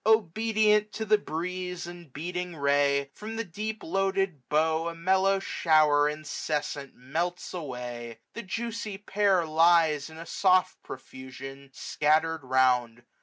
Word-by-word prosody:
Obedient 215 +1 +3
to 220 - -3
the 215 0 +4
breeze 180 +1 -4
and 175 -4 -11
beating 180 +4 -4
ray. 140 -1 +2
From 220 +1 -7
the 230 - -2
deep 215 +3 -5
loaded 195 -3 0
bough 160 +2 +2
a 170 - -4
mellow 190 +3 +2
shower 155 -5 +3
Incessant 150 -2 -4
melts 165 +8 -3
away. 125 -7 -6 0.2
The 235 - -5
juicy 220 0 -4
pear 200 -2 +2
630 160 -2 -6
Lies, 165 -3 +4
in 160 - -12
a 165 - -8
soft 185 0 +2
profusion, 130 +1 -10
scattered 155 +4 +1
round. 125 -2 +2
165 Hz, 130 wpm, -28 LUFS, 140-195 Hz, 0.2 s, the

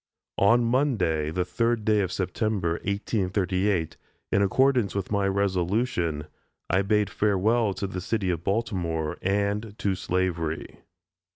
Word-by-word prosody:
On 115 +5 +5
Monday, 110 - +1
the 90 +3 -1
third 115 +4 0
day 110 -1 +3
of 95 -3 0
September, 95 -1 -1
1838, 95 -3 0 0.3
in 100 - +3
accordance 125 +2 +2
with 100 -1 -3
my 100 -1 +1
resolution, 95 - 0 0.5
I 95 +2 +3
bade 105 +1 +1
farewell 105 +1 +2
to - - -3
the 95 -1 -4
city 100 -2 -1
of 85 -1 -3
Baltimore, 90 -7 -1
and 100 +2 -1
to 100 - 0
slavery. 90 -4 -2
100 Hz, 125 wpm, -26 LUFS, 90-105 Hz, 0.5 s, On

